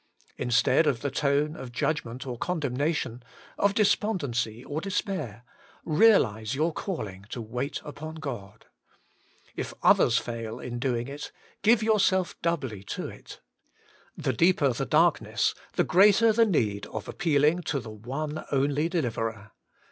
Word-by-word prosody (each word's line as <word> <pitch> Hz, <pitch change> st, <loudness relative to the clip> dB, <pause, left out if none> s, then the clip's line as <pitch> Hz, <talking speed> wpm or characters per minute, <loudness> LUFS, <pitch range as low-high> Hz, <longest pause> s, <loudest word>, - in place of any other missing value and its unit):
Instead 125 Hz, +5 st, +3 dB
of 120 Hz, -5 st, +1 dB
the 140 Hz, -, -2 dB
tone 145 Hz, +3 st, +1 dB
of 130 Hz, -2 st, -8 dB
judgment 125 Hz, -1 st, -2 dB
or 125 Hz, -2 st, -4 dB
condemnation, 140 Hz, -4 st, -2 dB, 0.4 s
of 200 Hz, 0 st, +2 dB
despondency 140 Hz, -, 0 dB
or 150 Hz, +2 st, -3 dB
despair, 185 Hz, -, -3 dB, 0.4 s
realise 145 Hz, -, +3 dB
your 160 Hz, +4 st, +1 dB
calling 105 Hz, -, -5 dB
to 120 Hz, -, -5 dB
wait 125 Hz, +6 st, -3 dB
upon 155 Hz, +2 st, -7 dB
God. 115 Hz, -10 st, -7 dB, 0.9 s
If -, -, -5 dB
others 115 Hz, -, +5 dB
fail 115 Hz, -1 st, -4 dB
in 120 Hz, -1 st, -5 dB
doing 120 Hz, -2 st, -1 dB
it, 145 Hz, +1 st, -7 dB, 0.3 s
give 220 Hz, +1 st, +4 dB
yourself 195 Hz, -4 st, +2 dB
doubly 135 Hz, -, -2 dB
to -, -, -4 dB
it. -, -, -12 dB, 0.8 s
The -, -, -1 dB
deeper 165 Hz, -6 st, +3 dB
the -, -, -3 dB
darkness, -, -, +2 dB, 0.2 s
the -, -, +2 dB
greater 210 Hz, +4 st, +5 dB
the 230 Hz, +1 st, +4 dB
need 105 Hz, -, 0 dB
of 110 Hz, -, -6 dB
appealing 160 Hz, -1 st, +2 dB
to 140 Hz, -, 0 dB
the 115 Hz, -3 st, -8 dB
one 140 Hz, +8 st, -5 dB
only 145 Hz, +3 st, +1 dB
Deliverer. 115 Hz, -, -2 dB
140 Hz, 135 wpm, -27 LUFS, 115-170 Hz, 0.9 s, others